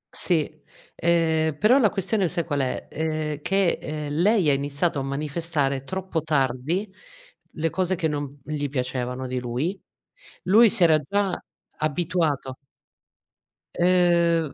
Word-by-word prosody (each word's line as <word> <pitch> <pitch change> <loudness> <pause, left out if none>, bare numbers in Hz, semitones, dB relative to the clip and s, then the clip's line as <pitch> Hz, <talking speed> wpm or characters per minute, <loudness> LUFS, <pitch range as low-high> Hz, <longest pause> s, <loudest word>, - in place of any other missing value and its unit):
Sì, 155 -3 0 0.3
ehm, 160 -2 +1
però 235 - +5
la 215 -6 +4
questione 195 -1 0
sai 170 -1 -1
qual 145 -4 -2
è? 130 -1 -2
Ehm, 155 -2 -3
che, 195 +1 +1
ehm, 150 -1 -5
lei 190 +3 +3
ha - - +4
iniziato 140 +3 -1
a 135 - -2
manifestare 145 -1 -2
troppo 190 +1 -3
tardi 150 - 0 0.7
le 165 0 -1
cose 185 0 0
che 165 -2 0
non 145 -2 -4
gli 145 -2 -3
piacevano 125 -1 -3
di 130 0 -3
lui. 130 +11 -3 0.6
Lui 220 +5 +6
si 190 - +4
era 160 -2 +5
già 195 +5 -1 0.4
abituato. 155 -4 -1 1.2
Ehm, 170 -3 +3
160 Hz, 130 wpm, -24 LUFS, 140-180 Hz, 1.2 s, Lui